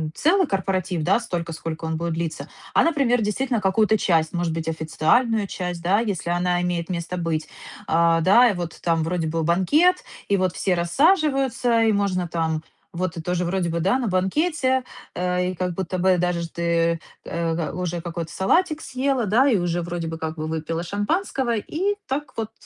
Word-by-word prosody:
целый 360 +3 +3
корпоратив, 190 - -1
да, 190 +7 +3
столько, 175 -7 -4
сколько 160 0 -6
он 160 0 -2
будет 170 0 -2
длиться, 165 -1 -4 0.3
а, - - +5
например, 275 -7 +2
действительно 235 +3 0
какую-то 215 +2 +2
часть, 165 -5 +2
может 175 -2 -1
быть, 165 0 -3
официальную 165 +8 +1
часть, 180 -2 -4
да, 190 +4 +3
если 200 -7 -2
она 175 0 +1
имеет 175 -1 -1
место 175 0 -3
быть. 165 -2 -2 0.4
Да 170 +8 +5
и - - +1
вот 175 -3 -4
вот - - -19
там 165 -2 +1
вроде 165 0 -1
бы 165 +1 -1
банкет, 285 - +3 0.3
и 200 - +3
вот 185 -1 0
все 190 - 0
рассаживаются, 265 - +2
и 225 - +4
можно 195 -3 0
там 160 -1 -1 0.3
вот 175 -1 -2
тоже 180 0 0
вроде 175 0 -1
бы 170 0 -1
да, 195 +9 +2
на 245 - -1
банкете, 260 - +1 0.3
и, - - -3
э, 180 0 0
как 180 0 -2
будто 185 +1 -3
бы 185 0 +3
даже 175 -1 -1
ты, 170 0 0 0.2
э, 165 -1 -2
уже 175 -1 -3
какой-то 165 -1 -5
салатик 310 - +1
съела, 260 -1 -1
да, 240 +8 +4
и 230 - +3
уже 175 -1 -1
вроде 170 -1 -4
бы 160 0 -4
как 160 0 -4
бы 155 - -3
выпила 160 +1 -3
шампанского, 235 - -1
и 375 - -1
так 280 +1 -3
вот 225 -1 -3
180 Hz, 185 wpm, -23 LUFS, 170-225 Hz, 0.4 s, а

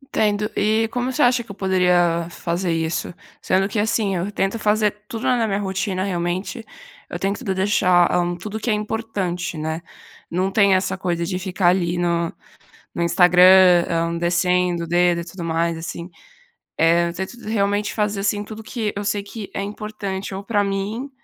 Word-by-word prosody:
Entendo. 210 0 +1
E 220 +2 +2
como 250 +1 -1
você 295 - +1
acha 245 -1 +3
que - - -24
eu 200 - -8
poderia 180 -3 +2
fazer 175 +1 -2
isso? 165 +1 -2 0.3
Sendo 190 +1 +1
que 205 - -2
assim, 210 -2 +1
eu 185 +4 -2
tento 195 +3 -1
fazer 210 0 +2 0.2
tudo 225 +2 -6
na 245 -3 +2
minha 195 -2 0
rotina, 190 -1 -2
realmente, 185 +5 -3 0.5
eu - - -4
tento 200 +6 -2
deixar, 190 -3 +3
hã, 175 0 +1
tudo 210 +5 -6
o - - -6
que 235 - -3
é 215 - +3
importante, 210 -6 -3
né. 160 +2 -3 0.5
Não 185 +3 -1
tem 200 -1 +4
essa 185 0 0
coisa 170 -2 -1
de 185 0 -3
ficar 185 -1 +1
ali 175 -1 +1
no 170 -1 0 0.6
no 170 - -3
Instagram, 180 0 +6
hum, 170 0 -1
descendo 180 0 +1
o - - -7
dedo 175 0 +3
e 170 - -6
tudo 170 0 -8
mais, 165 0 0
assim. 170 +2 -6 0.7
Eh, 170 +1 +4
eu - - -6
tento 190 +7 -6
realmente 205 -1 0
fazer, 210 -2 -1
assim, 205 +1 0
tudo 215 +1 -9
que 215 -1 -3
eu 205 - -3
sei 205 -1 -1
que 205 0 -8
é - - -3
importante 200 -2 -5
ou 195 - -6
para 205 0 +1
mim 200 +7 -3
190 Hz, 185 wpm, -21 LUFS, 175-210 Hz, 0.7 s, Instagram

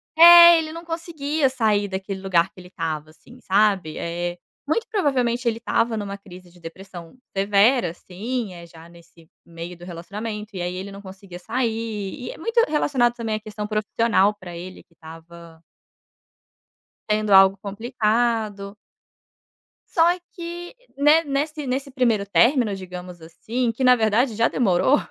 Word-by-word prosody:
É, 340 0 +10
ele 310 -1 -4
não 335 +1 -9
conseguia 315 -4 -2
sair 215 -5 +1
daquele 190 0 -5
lugar 190 -1 +1
que - - -16
ele 180 - -12
estava, 155 -4 -5
assim, 240 +10 -18
sabe. 195 -6 +1
Eh, 175 +1 -4 0.3
muito 455 +9 -1
provavelmente 255 - 0
ele 225 -1 +1
estava 230 0 0
numa 200 -1 -5
crise 180 -3 -14
de 175 - -20
depressão 175 +3 -11 0.2
severa, 200 +3 +3
assim, 200 +5 -5
eh, 170 -1 -11
já 165 0 -15
nesse 170 -1 -19 0.2
meio 170 +1 -9
do 175 - -15
relacionamento, 210 +4 -7
e 180 - -4
aí 180 +1 -3
ele 190 +2 -6
não 200 0 -10
conseguia 190 -2 -11
sair, 220 -1 -3
e - - -5
é - - -12
muito 460 +8 -5
relacionado 265 -5 +1
também 225 -2 -3
à - - -3
questão 215 -1 -7
profissional 215 -1 +1
pra 180 -3 -10
ele, 180 +2 -9
que 170 - -32
estava 165 0 -14 1.4
sendo 215 -1 +1
algo 195 0 +6
complicado. 215 -1 -2 1.2
Só 330 - +1 0.3
que 345 +3 -8 0.2
ne 300 +3 +5
nesse 295 0 -3
nesse 270 +2 -3
primeiro 235 -6 +1
término, 235 +1 +3
digamos 180 -2 -9
assim, 230 +9 -3
que 235 +4 -4
na 250 0 +6
verdade 225 +1 +1
já 230 +2 +3
demorou, 210 +4 +2
210 Hz, 155 wpm, -22 LUFS, 180-250 Hz, 1.4 s, É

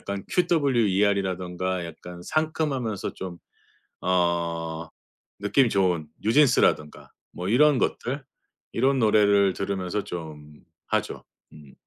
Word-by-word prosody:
약간 100 -1 -5
QWER이라든가 100 - +1
약간 85 +2 -10
상큼하면서 150 -9 -2
좀 90 -2 -7 0.6
어 85 -2 -1 0.5
느낌 110 +6 +3
좋은 90 -6 +1 0.2
뉴진스라든가 110 - +2 0.2
뭐 90 +1 -6
이런 145 +3 +4
것들 135 +3 -2 0.5
이런 135 +2 +2
노래를 100 -3 +4
들으면서 95 +1 -3
좀 75 -3 -9 0.2
하죠. - - -2 0.3
음. 75 -3 -15
95 Hz, 240 characters per minute, -25 LUFS, 85-120 Hz, 0.6 s, 이런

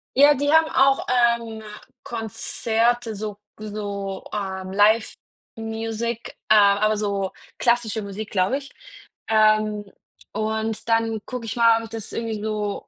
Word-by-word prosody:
Ja, 290 +2 +7
die 285 +2 0
haben 320 0 +5
auch, 270 +1 +3 0.3
ähm, 225 -1 -8 0.4
Konzerte 230 +1 -1
so 210 0 -5 0.2
so, 200 -2 -5
ähm, 190 -2 -4
Live-Music, 225 +2 -1
äh, - - +7
aber 210 +1 +4
so 200 -2 -1 0.3
klassische 235 -3 +1
Musik, 205 +2 -6
glaube 190 +7 +1
ich. 280 0 -10 0.6
Ähm, 215 -1 +3 0.5
und 220 +1 -2
dann 225 -1 +1
gucke 250 -3 -6
ich 220 - -3
mal, 230 -1 +5
ob 225 - -7
ich - - -12
das 225 -3 -6
irgendwie 225 -2 -3
so 210 -2 -3
220 Hz, 130 wpm, -23 LUFS, 210-230 Hz, 0.6 s, Ja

